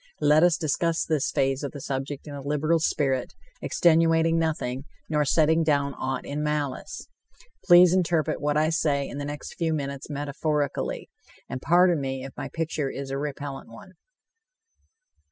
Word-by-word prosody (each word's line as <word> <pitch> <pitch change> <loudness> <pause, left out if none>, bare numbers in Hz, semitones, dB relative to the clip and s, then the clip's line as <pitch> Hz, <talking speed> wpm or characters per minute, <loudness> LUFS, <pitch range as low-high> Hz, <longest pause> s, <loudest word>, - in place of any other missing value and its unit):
Let 150 +1 +5
us 175 -1 +4
discuss 165 +2 0
this 155 -4 0
phase 135 0 0
of 140 - -4
the 145 - -7
subject 135 +1 -4
in 150 - -8
a 140 - -6
liberal 150 +4 +1
spirit, 135 -5 0 0.3
extenuating 165 0 +3
nothing, 140 -5 -2 0.2
nor 150 -2 +1
setting 160 +3 +3
down 140 -2 +1
aught 130 0 -4
in 145 +1 -4
malice. 150 - -3 0.6
Please 175 -1 +7
interpret 170 -6 +1
what 150 0 +1
I 155 +1 +2
say 145 -3 0
in 140 - -7
the 145 - -4
next 145 0 -6
few 165 -2 -1
minutes 140 -1 -5
metaphorically, 145 0 -2 0.4
and 130 - -6
pardon 175 0 +4
me 135 -1 -4
if 135 - -10
my - - -6
picture 160 -3 -2
is 135 0 -6
a 135 - -2
repellant 140 -2 -6
one. 115 +10 -13
150 Hz, 160 wpm, -26 LUFS, 140-160 Hz, 0.6 s, Please